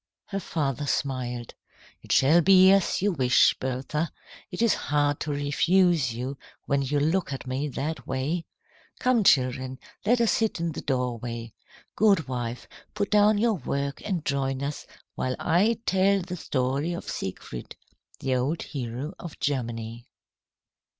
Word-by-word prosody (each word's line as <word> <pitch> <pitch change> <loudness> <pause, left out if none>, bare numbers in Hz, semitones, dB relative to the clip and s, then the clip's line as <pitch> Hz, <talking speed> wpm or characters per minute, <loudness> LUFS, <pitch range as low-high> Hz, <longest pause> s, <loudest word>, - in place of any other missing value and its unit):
Her 195 - -2
father 145 -5 -2
smiled. 125 -4 -2 0.5
"It - - -8
shall 155 +6 +5
be 190 +1 +7
as 195 -1 +2
you 205 - +3
wish, 130 -6 +4
Bertha. 135 +5 -2 0.4
It 195 +3 -2
is 230 - +4
hard 145 0 0
to 150 - -3
refuse 145 +1 +2
you 130 +4 -5 0.3
when 140 0 +1
you 140 +2 0
look 160 +3 +1
at 135 - -5
me 130 +3 -2
that 140 -1 -4
way. 150 +6 -2 0.5
Come, 250 -3 +3
children, 130 -4 +2 0.3
let 240 +4 +3
us 230 -2 +3
sit 225 -5 0
in 170 0 -1
the - - -6
doorway. 120 -3 -3 0.4
Goodwife, 130 - +1 0.3
put 205 -1 -1
down 210 0 +5
your 225 +2 +3
work 140 -4 -3
and 180 -6 -2
join 135 -1 -1
us 145 +1 -4 0.3
while 130 0 -2
I 205 +8 +2
tell 195 +1 +3
the 180 0 -5
story 140 +1 -1
of 175 - -6
Siegfried, 75 -9 -6 0.5
the 130 -1 0
old 140 +7 -1
hero 130 +4 -5
of 170 -3 -9
Germany." 120 -3 -3
145 Hz, 145 wpm, -26 LUFS, 130-180 Hz, 0.5 s, be